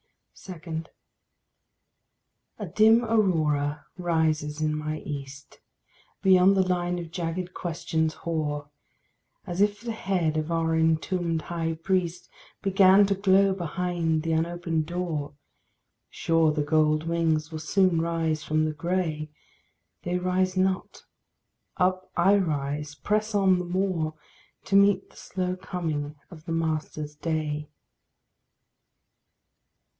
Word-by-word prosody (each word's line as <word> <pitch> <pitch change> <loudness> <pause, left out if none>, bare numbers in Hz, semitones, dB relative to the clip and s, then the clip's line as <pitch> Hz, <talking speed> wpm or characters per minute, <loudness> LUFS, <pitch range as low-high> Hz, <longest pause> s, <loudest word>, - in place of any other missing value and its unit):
2. 165 -3 -6 1.7
A 210 - -5
dim 220 +6 +5
aurora 155 -9 +1
rises 160 -4 0
in 155 0 0
my 155 0 -3
east, 140 -1 -8 0.6
Beyond 190 +1 +6
the 190 -1 +3
line 175 -1 0
of 170 -2 -6
jagged 175 +1 -3
questions 160 -2 -2
hoar, 150 -3 -3 0.7
As 175 +2 -2
if 205 0 +2
the 235 +1 -5
head 180 -7 -1
of 155 +2 -2
our 165 -1 +1
intombed 160 +1 +1
High 165 -1 -2
Priest 175 0 -1 0.4
Began 195 +1 +6
to 200 - +1
glow 195 0 +4
behind 170 -3 -1
the 165 - -1
unopened 165 -1 -1
door: 160 -5 -3 0.7
Sure 165 -1 +2
the 150 -1 0
gold 155 +1 +2
wings 165 -2 0
will 160 - -5
soon 170 +1 +2
rise 165 -2 -1
from 155 0 +1
the 155 - -1
gray! 160 -2 -2 0.7
They 175 +1 -1
rise 185 +1 0
not. 185 0 -1 0.7
Up 185 0 +1
I 190 +4 +5
rise, 145 -4 -2
press 210 +8 -1
on 190 -2 +4
the 180 - -3
more, 175 -4 -1 0.5
To 195 - 0
meet 200 -1 +4
the - - -23
slow 185 -1 -3
coming 155 -5 -4 0.2
of 160 -2 -12
the 170 - -5
Master's 155 -2 -2
day. 150 -1 -3
165 Hz, 120 wpm, -26 LUFS, 155-185 Hz, 1.7 s, Beyond